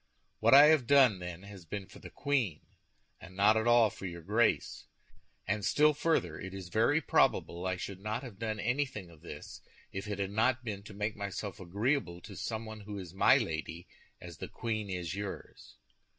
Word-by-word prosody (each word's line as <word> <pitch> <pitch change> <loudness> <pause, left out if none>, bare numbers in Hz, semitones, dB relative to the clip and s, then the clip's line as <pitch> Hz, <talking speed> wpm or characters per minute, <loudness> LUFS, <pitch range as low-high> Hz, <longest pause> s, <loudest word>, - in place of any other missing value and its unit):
What - - +6
I 140 - +11
have 150 -7 +3
done, 130 -8 +5
then, 90 0 -7
has 100 -2 -11
been 95 +4 -6
for - - -14
the - - -10
queen, 130 - -1 0.6
and 95 - -12
not 105 +2 +5
at 110 +1 +1
all 120 -3 +5
for 95 - -7
your 85 -1 -8
Grace. 110 +5 +1 0.6
And 105 +2 -1
still 150 +7 +4
further, 150 - 0
it 95 +1 -7
is 95 -3 -7
very 115 - +3
probable 90 - +1
I 95 - 0
should 95 +1 -6
not 110 +5 -3
have 110 -7 -10
done 110 -2 -3
anything 120 -7 -2
of 80 -2 -17
this, - - -9 0.3
if 95 +2 -5
it 105 -1 -3
had 100 -1 -2
not 120 +5 +1
been 100 -3 -4
to 105 - -10
make 105 +1 -2
myself 100 0 -5
agreeable 100 +1 -1
to 100 - -10
someone 110 +2 -5
who 105 0 -7
is 90 -3 -8
my 95 - +5
lady, 80 +2 -4 0.3
as - - -11
the - - -5
queen 110 -3 -3
is 90 -1 -3
yours." 100 0 -7
105 Hz, 195 wpm, -32 LUFS, 95-115 Hz, 0.6 s, I